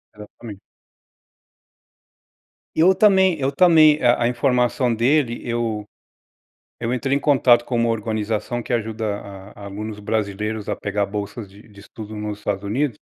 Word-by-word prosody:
Exatamente. 105 0 -11 2.2
E - - -3
eu 185 +4 +5
também 190 -5 +4
eu 135 0 0
também 155 -1 +5
a 120 0 +3
a - - +3
informação 125 0 +1
dele, 120 +1 +1
eu 115 -3 -2 0.9
eu 115 0 -3
entrei 135 +2 0
em - - +2
contato 130 -5 +4
com 125 - -5
uma 115 0 +1
organização 110 +1 -2
que - - -6
ajuda 110 -1 -2 0.2
a 100 0 -11
a - - -8
alunos 105 +1 -7
brasileiros 105 0 -3
a - - -2
pegar 100 0 -2
bolsas 105 +1 -6
de 100 +2 -16
de 100 -2 -16
estudo 110 +1 -10
nos 105 -1 -5
Estados 100 -1 -3
Unidos. 120 +3 -1
115 Hz, 150 wpm, -21 LUFS, 105-130 Hz, 2.2 s, eu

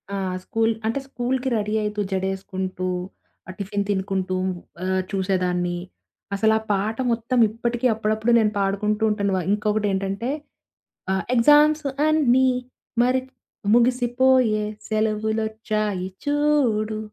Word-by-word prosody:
ఆ! - - -2 0.3
స్కూలు 225 +2 +1
అంటే, 230 +5 0
స్కూలు‌కి 260 0 -2
రెడీ 210 0 -2
అయితూ 210 0 -2
జడేసుకుంటూ, 190 -1 -3 0.6
ఆ - - -4
టిఫిన్ 200 +1 -2
తినుకుంటూ 190 -1 -1 0.5
ఆహ్, 190 0 +1
చూసేదాన్ని. 180 -2 0 0.6
అసలా 220 +2 +3
ఆ - - -14
పాట 205 +3 0
మొత్తం 235 +2 0
ఇప్పటికి 235 +2 -2
అప్పుడప్పుడు 220 +2 0
నేను 210 -1 +2
పాడుకుంటూ 210 +2 0
ఉంటాను 200 -2 0
వా - - 0
ఇంకొకటి 210 0 +1
ఏంటంటే, 195 +5 -2 0.8
ఆ - - +2 0.2
ఎగ్జామ్స్ 295 +5 +5 0.2
అన్ని 260 -5 +4 0.6
మరి 255 +1 +2 0.5
ముగిసిపోయే 245 -2 +3 0.2
సెలవులొచ్చాయి 215 -2 -1 0.2
చూడు 275 -8 +1
215 Hz, 110 wpm, -23 LUFS, 195-240 Hz, 0.8 s, ఎగ్జామ్స్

